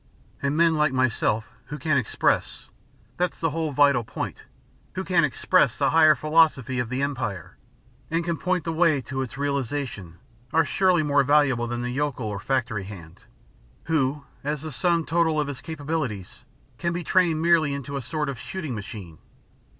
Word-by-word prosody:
And 140 +2 0
men 165 0 +4
like 150 -3 +2
myself 115 -3 0
who 150 - -6
can 155 +1 0
express 130 -5 0 0.5
that's 180 -1 -1
the 165 -2 0
whole 160 0 -2
vital 140 -3 +4
point - - -6 0.5
who 185 - -3
can 180 -3 +2
EXPRESS 130 -2 +2
the 140 -1 +2
higher 155 -1 +6
philosophy 150 -5 +2
of 120 -2 -2
the 130 +2 -1
Empire, 110 - -3 0.5
and 165 +1 -1
can 170 -1 0
point 180 +2 -1
the 165 - -2
way 160 -3 +3
to 130 +2 -4
its 130 0 -6
realisation 135 - -3 0.3
are 160 +1 +3
surely 180 -1 +2
more 145 -1 +3
valuable 140 -4 +3
than 120 0 -3
the 125 - -2
yokel 135 -2 -2
or 105 -2 -3
factory 115 -3 -1
hand, 90 -5 -11 0.6
who, 145 -3 0 0.2
as 150 +1 -2
the 155 - -5
sum 170 +3 +1
total 160 -1 +1
of 150 - 0
his 135 -2 -6
capabilities, 145 - -4 0.3
can 170 0 -1
be 175 0 -3
trained 170 -2 +2
merely 165 -3 +3
into 140 0 -5
a 140 - -2
sort 150 +4 -3
of 135 -4 -4
shooting 140 +3 -5
machine. 100 -7 -8
145 Hz, 175 wpm, -25 LUFS, 125-160 Hz, 0.6 s, higher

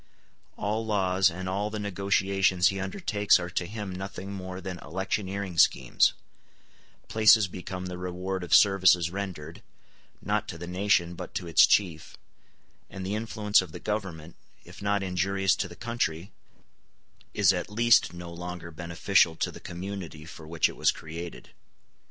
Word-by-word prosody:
All 110 +2 -1
laws 95 -3 +2
and 90 +2 -6
all 100 +3 -1
the 110 - -5
negotiations 95 -2 +1
he 95 - -4
undertakes 100 +1 +2
are 90 0 -5
to 90 -1 -2
him 105 -2 -6
nothing 95 +1 -6
more 95 -1 -6
than 95 -2 -6
electioneering 95 +1 -3
schemes; - - +4 0.9
places 110 -1 +5
become 90 0 -7
the 90 -1 -6
reward 90 +1 -4
of 90 - +3
services 95 -4 +5
rendered, 90 -5 -6 0.6
not - - -1
to 85 - -6
the 85 - -7
nation, 90 -1 +1
but - - -9
to - - -3
its 85 - +6
chief; 85 -6 0 0.7
and 95 -1 -7
the 95 - -2
influence 105 -2 +2
of 90 -4 -9
the - - -7
government, 90 -7 -4 0.3
if - - -13
not 100 0 0
injurious 95 +1 +1
to 100 - -2
the 85 - -12
country, 100 -7 -3 1.0
is 100 -2 +5
at 90 +2 -3
least 115 -2 +4
no 85 -1 -9
longer 90 -1 -7
beneficial 85 +1 +2
to - - -2
the - - -11
community 85 -4 -7
for 80 -1 -11
which 80 0 +2
it - - -9
was - - +2
created. 85 +2 -6
95 Hz, 155 wpm, -27 LUFS, 85-100 Hz, 1.0 s, its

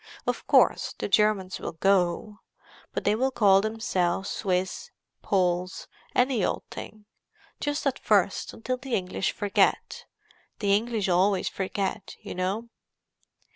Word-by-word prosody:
Of - - -2
course, - - +3
the - - -3
Germans 205 -2 +2
will - - -5
go—but 195 +3 -2
they 205 - +3
will 255 +5 +1
call 200 -6 +4
themselves 195 -4 -1
Swiss, 185 -2 -2 0.3
Poles, 180 -1 0 0.3
any 250 -4 +2
old - - -1
thing. 215 -1 -9 0.5
Just 290 0 -2
at 270 -2 0
first, 200 -2 +1
until 255 +3 -3
the 250 -1 -3
English 185 0 -1
forget: 205 -1 0 0.5
the 200 -2 +1
English 220 -1 -1
always 185 +1 +2
forget, 195 0 -3
you - - -7
know." 195 +6 -2
200 Hz, 125 wpm, -27 LUFS, 185-225 Hz, 0.5 s, call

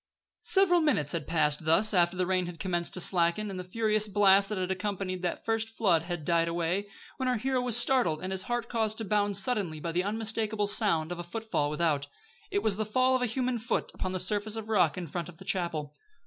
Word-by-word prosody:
Several 360 -3 +3
minutes 250 - +1
had 165 -3 -3
passed 155 -2 +1
thus 180 +8 +3
after 175 -1 +3
the 185 - +1
rain 185 -1 0
had 170 -1 -8
commenced 175 -3 -1
to - - -2
slacken, 180 +3 +1
and 185 - -5
the - - -4
furious 215 +2 0
blast 195 -1 +4
that 210 - -3
had 185 0 -1
accompanied 190 -1 -3
the 180 - -2
first 225 0 0
flood 195 -7 +2
had 175 -2 -5
died 170 -1 +2
away, 170 +4 -1 0.3
when 260 -1 0
our 250 - +1
hero 260 +2 0
was 245 -2 +1
startled 240 -11 +2
and 185 - -3
his 190 -1 0
heart 240 0 -2
caused 220 -2 -1
to 225 - -2
bound 205 0 +1
suddenly 195 -7 -1
by 165 +2 -3
the 175 +2 0
unmistakable 220 0 -1
sound 180 -6 +1
of 175 - -4
a - - -4
footfall 175 -5 -2
without. 150 -2 0 0.4
It 405 - -1
was 200 -2 +2
the 215 - 0
fall 255 +5 +2
of 255 - 0
a 250 - +1
human 250 +1 -1
foot 225 - -2
upon 185 - -3
the 185 - -2
surface 210 +2 0
of 220 -1 -6
rock 185 -6 +3
in 180 - -4
front 170 +2 -5
of 165 - -13
the - - -12
chapel! 160 -5 -2
195 Hz, 230 wpm, -29 LUFS, 170-220 Hz, 0.4 s, blast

